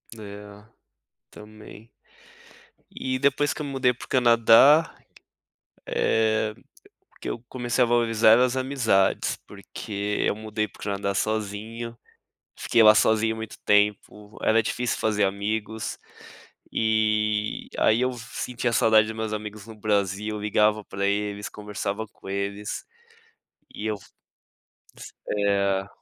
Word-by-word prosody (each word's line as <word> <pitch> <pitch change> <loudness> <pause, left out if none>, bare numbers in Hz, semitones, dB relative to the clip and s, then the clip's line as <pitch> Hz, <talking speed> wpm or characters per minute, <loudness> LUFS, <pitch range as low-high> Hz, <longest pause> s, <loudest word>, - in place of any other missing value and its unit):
É 105 -1 -11 0.7
também. 110 +1 -13 1.0
E 130 0 -3
depois 140 +2 +2
que - - -8
eu - - -5
mudei 135 -3 +1
pro 125 - -12
Canadá, 125 +5 +5 0.9
é 110 -1 +1 0.7
que - - -5
eu - - -4
comecei 120 0 -1
a - - 0
valorizar 115 -1 +4
as 125 0 +2
amizades, 125 -8 +1
porque 105 0 -5
eu - - +2
mudei 110 0 -3
para 100 - -19
o - - -12
Canadá 100 -1 -2
sozinho 110 +3 -3 0.6
e - - -12
fiquei 115 - +4
lá 110 0 +9
sozinho 110 +1 +3
muito 110 -1 -8
tempo, 105 0 0
era 110 +1 +4
difícil 125 +2 -2
fazer 105 -2 +1
amigos. 105 +3 -3 0.7
E 110 -1 0
aí 110 +2 +3
eu 130 0 +1
sentia 120 0 -4
saudade 110 -1 +4
dos 110 - -6
meus 110 -1 -3
amigos 105 -1 -6
no 110 - -10
Brasil, 105 0 -1
ligava 105 0 +2
para 100 +1 -4
eles, 105 0 -2
conversava 105 0 -5
com 95 - -15
eles 100 +2 -4 0.9
e 110 - -5
eu, 110 - -1
s 95 - -16 1.3
eh 100 -1 +1
110 Hz, 125 wpm, -25 LUFS, 105-115 Hz, 1.3 s, lá